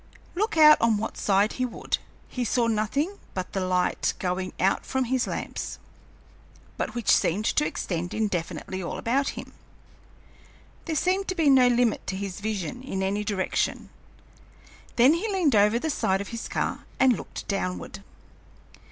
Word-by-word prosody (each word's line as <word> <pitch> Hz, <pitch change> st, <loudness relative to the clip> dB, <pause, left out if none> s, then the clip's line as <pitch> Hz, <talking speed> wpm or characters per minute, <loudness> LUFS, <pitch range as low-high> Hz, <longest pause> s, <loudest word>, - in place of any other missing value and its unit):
Look 425 Hz, +1 st, -1 dB
out 305 Hz, -1 st, +8 dB
on 230 Hz, -2 st, +3 dB
what 220 Hz, +2 st, -4 dB
side 200 Hz, +1 st, +2 dB
he 255 Hz, -, -2 dB
would, 240 Hz, -, -3 dB, 0.3 s
he 250 Hz, -, -3 dB
saw 240 Hz, +1 st, +1 dB
nothing 230 Hz, -, -1 dB, 0.2 s
but 185 Hz, -1 st, -4 dB
the 195 Hz, -, -1 dB
light 185 Hz, -1 st, 0 dB
going 185 Hz, 0 st, -2 dB
out 190 Hz, +1 st, +2 dB
from 265 Hz, 0 st, -1 dB
his 255 Hz, +1 st, 0 dB
lamps, -, -, -4 dB, 1.0 s
but -, -, -3 dB
which 235 Hz, -3 st, +1 dB
seemed 200 Hz, +6 st, 0 dB
to 300 Hz, -, +2 dB
extend 175 Hz, -, -3 dB
indefinitely 190 Hz, -2 st, -3 dB
all 170 Hz, -, -4 dB
about 270 Hz, +4 st, 0 dB
him. -, -, -8 dB, 1.3 s
There 320 Hz, -, -2 dB
seemed 375 Hz, +5 st, +1 dB
to 375 Hz, -, -2 dB
be 315 Hz, -5 st, +4 dB
no 255 Hz, -2 st, +6 dB
limit 240 Hz, -2 st, +1 dB
to 190 Hz, -, -2 dB
his 195 Hz, -1 st, -5 dB
vision 215 Hz, +2 st, -3 dB
in 195 Hz, -7 st, -3 dB
any 200 Hz, +2 st, -1 dB
direction. 200 Hz, -3 st, -1 dB, 1.0 s
Then 250 Hz, +5 st, +6 dB
he 405 Hz, +6 st, -1 dB
leaned 355 Hz, -8 st, +2 dB
over 210 Hz, +2 st, +4 dB
the 315 Hz, +6 st, -1 dB
side 190 Hz, -9 st, +1 dB
of 200 Hz, -, -5 dB
his 230 Hz, -1 st, -5 dB
car -, -, -2 dB
and 260 Hz, -2 st, +5 dB
looked -, -, -8 dB
downward. 195 Hz, 0 st, -3 dB
225 Hz, 160 wpm, -26 LUFS, 195-275 Hz, 1.3 s, out